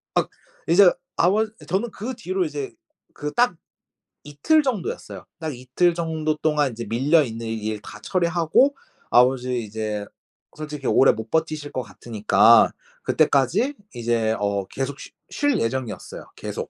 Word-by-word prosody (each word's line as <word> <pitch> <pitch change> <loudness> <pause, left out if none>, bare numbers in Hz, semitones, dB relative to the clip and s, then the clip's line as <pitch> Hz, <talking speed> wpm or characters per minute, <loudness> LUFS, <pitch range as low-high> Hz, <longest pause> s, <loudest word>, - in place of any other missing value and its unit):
아 - - +2 0.4
이제 180 +1 +7 0.3
아버 205 +5 +3 0.2
저는 200 +6 -1
그 235 +6 -5
뒤로 375 +4 -2
이제 400 +3 -5 0.4
그 150 0 -5
딱 240 -7 +3 0.7
이틀 150 - +2
정도였어요. 240 -10 -4
딱 155 -5 -4
이틀 130 +8 +1
정도 160 -2 -1
동안 150 -3 +1
이제 115 +1 -6
밀려 145 +7 +3
있는 115 -2 -6
일 110 -1 -3
다 105 - -11
처리하고 175 - +2 0.4
아버지 125 0 +3
이제 105 -1 -4 0.5
솔직히 150 -3 -5
오래 135 - +5
못 110 0 -7
버티실 155 -2 -1
거 130 - -2
같으니까 110 -1 +4 0.3
그때까지 140 - +2 0.2
이제 115 -2 0
어 100 -1 -1
계속 135 +1 -4
쉬 - - -10 0.2
쉴 290 -4 +1
예정이었어요, 120 -1 -4
계속. - - -6
145 Hz, 280 characters per minute, -23 LUFS, 115-180 Hz, 0.7 s, 이제